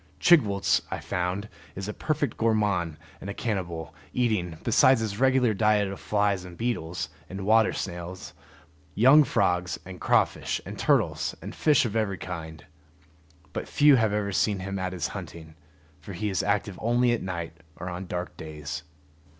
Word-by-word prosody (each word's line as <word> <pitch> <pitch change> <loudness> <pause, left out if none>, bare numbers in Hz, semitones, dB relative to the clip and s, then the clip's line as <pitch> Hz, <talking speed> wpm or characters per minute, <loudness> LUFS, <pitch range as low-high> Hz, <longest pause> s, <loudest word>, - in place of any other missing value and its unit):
Chigwooltz, 105 - +4
I - - -3
found, 90 +4 -2 0.3
is 95 +1 -5
a 105 - -3
perfect 145 -3 -1
gourmand 105 -8 +1 0.2
and 100 - -6
a 100 - -5
cannibal, 85 -8 -3 0.2
eating, 105 -9 0
besides 125 +2 +5
his 110 -2 -3
regular 130 -3 +3
diet 105 0 +3
of 95 - -7
flies 100 -3 0
and 90 -2 -11
beetles 90 -7 -2 0.2
and 95 +1 -5
water 110 +1 +5
snails, 90 0 -6 0.6
young 135 +7 +7
frogs, 90 -8 0
and 95 -1 -10
crawfish, - - +1
and - - -8
turtles, - - +1
and - - -8
fish 150 -4 +3
of 110 -2 -3
every 105 -4 0
kind. 80 -4 -7 0.9
But - - -4
few 145 -1 +6
have 110 -3 +2
ever 105 -1 -1
seen 100 +1 +1
him 100 +1 -4
at 95 -1 -2
his 90 -3 -2
hunting, 80 -1 -8 0.5
for 95 +6 -9
he 105 +4 -2
is 95 - 0
active 100 -1 -1
only 120 +2 +3
at 120 - 0
night 85 -3 -5 0.2
or 90 - -7
on 90 +1 -5
dark 90 0 -4
days. 75 -1 -6
100 Hz, 165 wpm, -27 LUFS, 90-110 Hz, 0.9 s, young